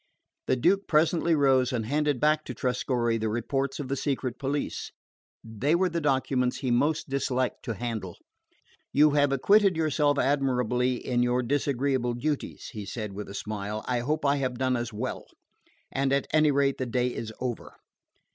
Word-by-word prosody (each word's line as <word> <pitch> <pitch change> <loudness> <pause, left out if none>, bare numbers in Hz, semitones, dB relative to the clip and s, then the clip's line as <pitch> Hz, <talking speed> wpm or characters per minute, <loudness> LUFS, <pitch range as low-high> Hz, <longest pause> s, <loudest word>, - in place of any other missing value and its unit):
The - - +3
Duke 195 +10 +2
presently 165 +1 +3
rose, 135 -3 +3
and 115 -4 -2
handed 145 +1 0
back 155 +2 +2
to 125 - -6
Trescorre 120 -1 0
the 110 0 -1
reports 135 +5 -2
of 145 - -4
the 135 - -1
secret 130 -3 -2
police. 140 +1 -3 0.5
They 115 +8 0
were 185 +1 +2
the 170 0 -2
documents 130 -3 +1
he 130 - -2
most 150 +6 +1
disliked 130 -2 -1
to 115 -4 -3
handle. 110 -5 -4 0.7
"You 150 +2 +5
have 145 -1 +3
acquitted 195 +6 +4
yourself 150 -2 +2
admirably 125 -3 +1
of 120 -1 +1
your 125 +1 +1
disagreeable 130 -2 0
duties," 145 +4 -3
he 105 -3 -5
said 105 0 -5
with 105 +1 -7
a 100 - -8
smile. 105 +1 -4
"I 125 -1 +1
hope 150 +5 -1
I 140 +1 +3
have 130 -3 -2
done 130 0 +1
as 120 0 -3
well. 110 +4 -5 0.7
At 135 0 +1
any 155 -1 +5
rate 140 -1 +1
the 130 - -2
day 125 +1 0
is 110 -1 -5
over." 125 -3 -5
130 Hz, 170 wpm, -27 LUFS, 120-145 Hz, 0.7 s, You